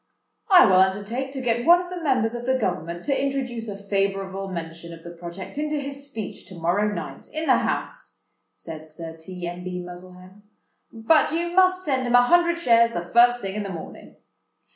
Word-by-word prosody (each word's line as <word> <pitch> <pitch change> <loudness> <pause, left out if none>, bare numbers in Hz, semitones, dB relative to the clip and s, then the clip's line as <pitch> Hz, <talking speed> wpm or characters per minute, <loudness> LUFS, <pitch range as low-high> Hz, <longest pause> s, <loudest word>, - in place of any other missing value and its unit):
"I 370 -2 +8
will 185 -3 +5
undertake 205 +8 +1
to 270 - -4
get 240 -1 0
one 345 +5 +7
of 360 0 -7
the 360 -1 -5
members 255 -7 +1
of 240 0 -6
the 260 0 +2
government 175 -6 -3
to 275 -1 0
introduce 255 -4 -3
a 200 -2 -6
favourable 195 -1 -2
mention 170 -2 -7
of 165 - -16
the 170 - -8
project 175 +8 -8
into 300 0 -1
his 280 -1 -5
speech 220 -6 -7
to 185 - -10
morrow 175 +5 0
night, - - -7
in 315 +1 -3
the - - +5
House," - - -4 0.3
said 160 -1 -10
Sir 160 +1 -8
T. 175 +2 -8
M. 175 +1 -6
B. 180 0 -4
Muzzlehem: 180 +2 -11 0.5
"but 235 +9 +3
you 340 +2 -1
must 370 0 +3
send 260 -4 0
him 245 - +3
a 245 - +7
hundred 340 +5 +3
shares 235 -7 +4
the 175 0 -4
first 240 +2 +5
thing 195 -1 -4
in 210 - -3
the 200 - -5
morning." 170 -4 -9
215 Hz, 200 wpm, -24 LUFS, 180-275 Hz, 0.5 s, I